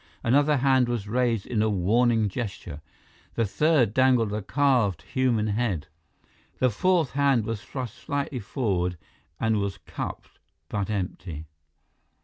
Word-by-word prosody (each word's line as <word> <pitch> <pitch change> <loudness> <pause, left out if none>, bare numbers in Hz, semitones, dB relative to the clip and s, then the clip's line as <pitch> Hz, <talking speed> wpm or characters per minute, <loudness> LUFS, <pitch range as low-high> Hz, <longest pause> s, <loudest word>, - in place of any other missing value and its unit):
Another 145 +4 +3
hand 130 -2 +3
was 115 -4 -2
raised 115 -2 0
in 115 -3 -1
a 110 - +2
warning 110 +3 +2
gesture. 95 -8 -5 0.5
The 115 - +1
third 130 -1 +2
dangled 125 -5 +3
a 105 - -2
carved 120 - +1
human 125 -5 +1
head. 100 -8 -1 0.7
The 130 -1 +2
fourth 170 - +2
hand 135 -5 +2
was 115 -1 -3
thrust 125 -5 -6
slightly 140 -2 -3
forward 95 -6 -1 0.4
and 110 -1 +1
was 100 -1 -2
cupped, - - -7 0.3
but 105 -1 -2
empty. 90 -5 -4
115 Hz, 130 wpm, -26 LUFS, 100-130 Hz, 0.7 s, Another